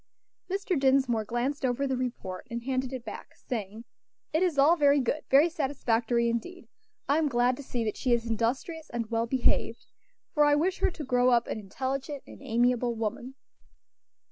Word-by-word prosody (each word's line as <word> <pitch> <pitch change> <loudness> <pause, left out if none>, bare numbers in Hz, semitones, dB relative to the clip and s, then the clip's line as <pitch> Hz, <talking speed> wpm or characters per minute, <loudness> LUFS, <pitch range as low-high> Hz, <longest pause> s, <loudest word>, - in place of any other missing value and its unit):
Mr. 385 -4 -1
Dinsmore 265 -5 +2
glanced 250 +6 -2
over 255 +2 0
the 265 -1 0
report 240 -7 -5
and 235 0 -4
handed 260 0 -1
it 255 -3 -6
back, 215 - -9
saying, 220 -1 -6 0.5
"It 315 - +2
is 355 -6 +1
all 290 +5 +6
very 285 -3 +4
good; 275 +4 -1
very 280 +5 +6
satisfactory 245 -7 0
indeed. 235 +11 -4 0.4
I 285 +3 +3
am 315 - +2
glad 245 0 +2
to - - -7
see 245 -3 -3
that 215 -2 -3
she 255 - -1
is 235 -1 +2
industrious 240 +8 -2
and 235 -1 -4
well 230 0 0
behaved, 255 0 +1 0.5
for 300 - +4
I 295 0 +5
wish 355 +6 0
her - - +3
to 330 -4 -7
grow 250 0 +3
up 235 -1 +3
an - - -4
intelligent 265 +7 -4
and - - -13
amiable 240 +1 +1
woman." 230 +4 -4
255 Hz, 180 wpm, -28 LUFS, 235-285 Hz, 0.5 s, all